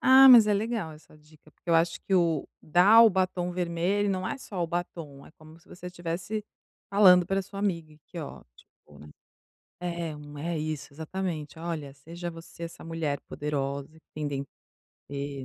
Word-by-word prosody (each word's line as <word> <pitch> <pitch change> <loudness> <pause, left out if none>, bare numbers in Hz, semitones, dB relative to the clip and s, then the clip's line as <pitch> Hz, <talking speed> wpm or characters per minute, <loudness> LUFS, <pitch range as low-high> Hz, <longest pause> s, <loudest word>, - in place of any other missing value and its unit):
ah, 265 +1 +8
mas 235 -4 +10
é 210 - +3
legal 215 -6 -2
essa 155 0 -17
dica 155 0 -21
porque 170 - -20
eu 165 - +4
acho 165 +1 +2
que 195 - 0
o, 165 -5 +2
dar 195 +8 +7
o 225 - +7
batom 185 -1 0
vermelho 180 +3 0
não 185 -1 -1
é 275 - -3
só 190 -8 -5
o - - 0
batom, 165 -5 -5
é - - -15
como 155 +1 -16
se - - -26
você 180 - -10
estivesse 180 +4 -4 0.4
falando 185 -3 +6
para 195 0 0
sua 195 +1 -10
amiga, 170 -6 -2
aqui 155 +3 -12
ótimo, 75 - -12
né. 75 - -12 0.8
É 170 -3 -3
não 145 0 -11
é 165 +3 -3
isso 155 -2 -4
exatamente 160 -1 -5
olha 160 -4 -5
seja 170 +5 -7
você 165 0 -11
essa 165 - -8
mulher 160 -3 -2
poderosa 140 -1 -3
que - - -49
tem 150 -1 -3
dentro 140 -1 -4 0.6
de 140 0 -5
170 Hz, 185 wpm, -28 LUFS, 150-185 Hz, 0.8 s, mas